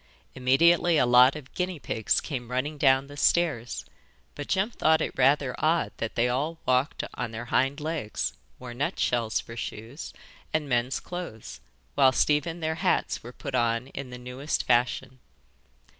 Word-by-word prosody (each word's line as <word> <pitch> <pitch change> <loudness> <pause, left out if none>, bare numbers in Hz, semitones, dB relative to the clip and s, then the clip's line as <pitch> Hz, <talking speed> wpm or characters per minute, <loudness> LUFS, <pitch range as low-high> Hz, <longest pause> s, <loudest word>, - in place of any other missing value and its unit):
Immediately 165 +6 +4
a 125 - +4
lot 125 +3 +6
of 145 -3 -10
guinea 180 -1 -2
pigs 110 -6 0
came 125 -6 -5
running 140 +4 -2
down 135 -1 +4
the 145 +1 -11
stairs, 145 -6 +1 0.5
but 145 - -7
Jem 195 +4 +1
thought 160 -7 +3
it - - -3
rather 135 0 +3
odd 165 +2 +1
that 110 - -4
they 120 +1 +2
all 145 +7 -1
walked 130 +3 +1
on 115 - -3
their 115 +2 -6
hind 135 +3 +2
legs, 145 - -3 0.2
wore 125 -1 -8
nutshells 120 -3 0
for 115 - -9
shoes, 115 +5 -7 0.4
and 155 -2 0
men's 125 0 0
clothes, 175 -12 -7 0.4
whilst 130 +2 +4
even 165 +3 0
their 160 0 -1
hats - - +1
were - - -9
put - - -7
on 115 +2 +1
in 140 -2 -7
the 125 - -8
newest 125 +4 -3
fashion. 125 +1 +1
135 Hz, 160 wpm, -27 LUFS, 125-155 Hz, 0.5 s, lot